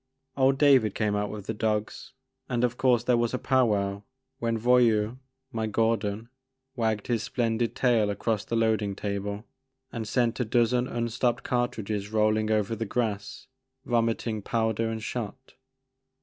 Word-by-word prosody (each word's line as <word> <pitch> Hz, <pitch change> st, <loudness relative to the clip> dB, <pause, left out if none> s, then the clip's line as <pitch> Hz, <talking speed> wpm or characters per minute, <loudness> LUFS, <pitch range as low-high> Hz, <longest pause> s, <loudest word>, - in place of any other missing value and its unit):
Old 135 Hz, 0 st, +3 dB
David 135 Hz, -8 st, +4 dB
came 105 Hz, -1 st, 0 dB
out 105 Hz, 0 st, -1 dB
with 105 Hz, -1 st, -7 dB
the 110 Hz, -, -2 dB
dogs 105 Hz, 0 st, -2 dB, 0.4 s
and 120 Hz, -1 st, 0 dB
of 120 Hz, -1 st, +1 dB
course 125 Hz, -2 st, +3 dB
there 120 Hz, -1 st, +3 dB
was 120 Hz, +1 st, 0 dB
a -, -, 0 dB
pow 130 Hz, -1 st, +2 dB
wow 100 Hz, -1 st, -1 dB, 0.4 s
when 115 Hz, -1 st, 0 dB
Voyou," 120 Hz, -1 st, +3 dB, 0.3 s
my 110 Hz, -1 st, -2 dB
Gor 115 Hz, +2 st, +2 dB
don, 105 Hz, +1 st, -4 dB, 0.5 s
wagged 110 Hz, -4 st, 0 dB
his 120 Hz, -3 st, 0 dB
splendid 120 Hz, -2 st, -1 dB
tail 115 Hz, -5 st, +2 dB
across 105 Hz, +1 st, -1 dB
the 115 Hz, -, -3 dB
loading 110 Hz, -3 st, +1 dB
table 100 Hz, +1 st, -4 dB, 0.5 s
and 115 Hz, -2 st, -5 dB
sent 120 Hz, +1 st, +1 dB
a -, -, +2 dB
dozen 120 Hz, +2 st, +2 dB
unstopped 120 Hz, +1 st, -1 dB
cartridges 110 Hz, -4 st, -2 dB
roll 110 Hz, 0 st, +3 dB
ing 110 Hz, 0 st, -1 dB
over 110 Hz, 0 st, +1 dB
the 115 Hz, -, -3 dB
grass, 105 Hz, -2 st, -3 dB, 0.4 s
vomiting 115 Hz, -2 st, 0 dB
powder 115 Hz, +1 st, 0 dB
and 110 Hz, -1 st, -4 dB
shot. 125 Hz, +3 st, -6 dB
115 Hz, 160 wpm, -27 LUFS, 105-120 Hz, 0.5 s, David